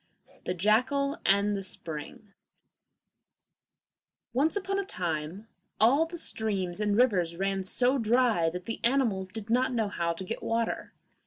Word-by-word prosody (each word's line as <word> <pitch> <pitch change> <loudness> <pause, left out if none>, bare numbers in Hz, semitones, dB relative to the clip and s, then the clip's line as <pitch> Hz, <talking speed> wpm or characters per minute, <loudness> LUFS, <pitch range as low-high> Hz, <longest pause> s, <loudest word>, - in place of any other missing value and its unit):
] - - -27
The 180 - -1
Jackal 255 - +2
and 200 +1 +3
the 195 - -3
Spring 180 +2 -6 2.0
Once 290 - +2
upon 390 0 -1
a - - 0
time 175 - -4 0.3
all 275 +9 +4
the 345 +1 -7
streams 200 - -2
and 210 -1 +1
rivers 185 -9 +3
ran 195 0 -1
so 250 +7 +2
dry 225 -7 +3
that 180 +2 -7
the 230 - -4
animals 235 -7 +1
did 215 +3 -7
not 255 +2 +2
know 220 -3 0
how 170 -3 -1
to 170 - -7
get 205 +5 -5
water. 230 0 -2
215 Hz, 150 wpm, -29 LUFS, 185-250 Hz, 2.0 s, all